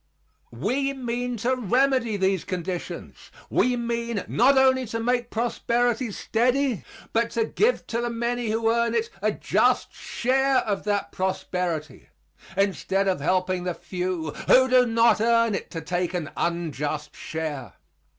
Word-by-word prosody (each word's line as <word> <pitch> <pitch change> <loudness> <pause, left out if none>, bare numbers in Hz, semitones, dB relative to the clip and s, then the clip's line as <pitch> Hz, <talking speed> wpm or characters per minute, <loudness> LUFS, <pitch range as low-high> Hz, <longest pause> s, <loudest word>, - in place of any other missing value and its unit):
We 260 - 0
mean 245 -1 -3
to 260 +1 +3
remedy 250 -1 +1
these 190 -3 +1
conditions. 180 -1 -5 0.2
We 250 0 +3
mean 235 -2 -2
not 265 +4 +4
only 260 -1 +4
to 230 +1 -3
make 245 +1 0
prosperity 240 +1 0
steady, 245 +3 0 0.3
but 230 +1 +2
to 225 - +3
give 445 - +1
to 235 +1 -2
the 240 - -1
many 235 0 -2
who 225 +1 +1
earn 235 0 +1
it 230 0 0
a 215 +1 +2
just - - +1
share 265 +2 +1
of 200 -2 -3
that 205 -1 -1
prosperity 180 -4 -3 0.5
instead 195 0 +1
of 185 -6 0
helping 185 +2 0
the 180 -1 -2
few 180 -4 -3 0.2
who 260 0 +6
do 250 -1 +5
not 230 -1 +4
earn 230 -1 +3
it - - -4
to 165 - -5
take 175 +3 -2
an 165 -4 -3
unjust 150 -3 -2
share. 150 -8 -5
225 Hz, 145 wpm, -25 LUFS, 185-245 Hz, 0.5 s, who